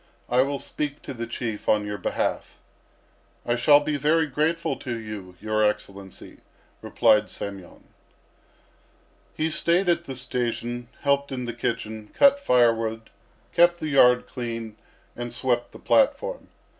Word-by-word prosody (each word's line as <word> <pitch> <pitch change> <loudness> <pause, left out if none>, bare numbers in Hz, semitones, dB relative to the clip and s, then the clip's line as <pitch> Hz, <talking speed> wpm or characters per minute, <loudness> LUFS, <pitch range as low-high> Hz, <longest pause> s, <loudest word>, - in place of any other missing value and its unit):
I 125 +1 +4
will 140 +1 0
speak 145 +1 -4
to - - -6
the 115 -1 -5
Chief 115 -2 -4
on 105 -1 +3
your 105 0 -5
behalf." - - -2 0.9
"I 120 - +1
shall 145 +4 +6
be 145 0 -1
very 155 +3 +2
grateful 155 +1 -1
to 120 -3 -5
you, 105 -5 -8
your 110 0 0
Excellency," 100 -2 -4 0.4
replied 105 0 +3
Semyon. 100 -3 -8 1.5
He 160 +1 0
stayed 170 +3 +1
at 170 -1 +1
the 135 - -6
station, 120 -1 -3
helped 140 0 +1
in 125 -2 -4
the 120 - -4
kitchen, 110 -2 -4
cut 280 0 +5
firewood, 115 - +1 0.4
kept 175 0 +4
the 155 - -3
yard 125 -3 +5
clean, 115 -3 -6 0.4
and 120 0 -5
swept 120 0 -1
the - - -12
platform. 290 - +1
125 Hz, 140 wpm, -25 LUFS, 110-150 Hz, 1.5 s, shall